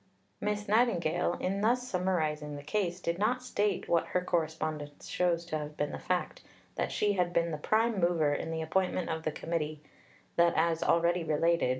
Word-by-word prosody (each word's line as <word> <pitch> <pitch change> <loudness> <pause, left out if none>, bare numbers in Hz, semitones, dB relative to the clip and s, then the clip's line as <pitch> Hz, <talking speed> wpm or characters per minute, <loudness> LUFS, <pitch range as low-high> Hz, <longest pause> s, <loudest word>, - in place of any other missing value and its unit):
Miss 210 0 -1
Nightingale, 180 -7 +2
in 195 +2 -1
thus 245 +3 +2
summarizing 155 -7 -1
the 145 - -8
case, 180 +2 -1
did 170 0 -2
not 245 +5 +1
state, 205 -5 0
what 170 -1 +2
her 180 - 0
correspondence 155 -3 -2
shows 170 -1 +1
to 155 -2 -2
have 150 0 -7
been 145 - -1
the - - -5
fact, 180 -1 -2 0.3
that - - -2
she 205 -1 +1
had 180 -2 +1
been 170 0 +2
the 155 - -2
prime 220 +5 +2
mover 170 -4 +2
in 145 - -3
the 160 0 -2
appointment 180 +1 0
of 160 0 -2
the 155 - -1
Committee; 155 -1 -3 0.6
that, 170 0 +4
as 165 -1 +2
already 170 +1 +3
related 165 +2 +2
(p. - - +1
170 Hz, 190 wpm, -31 LUFS, 160-190 Hz, 0.6 s, that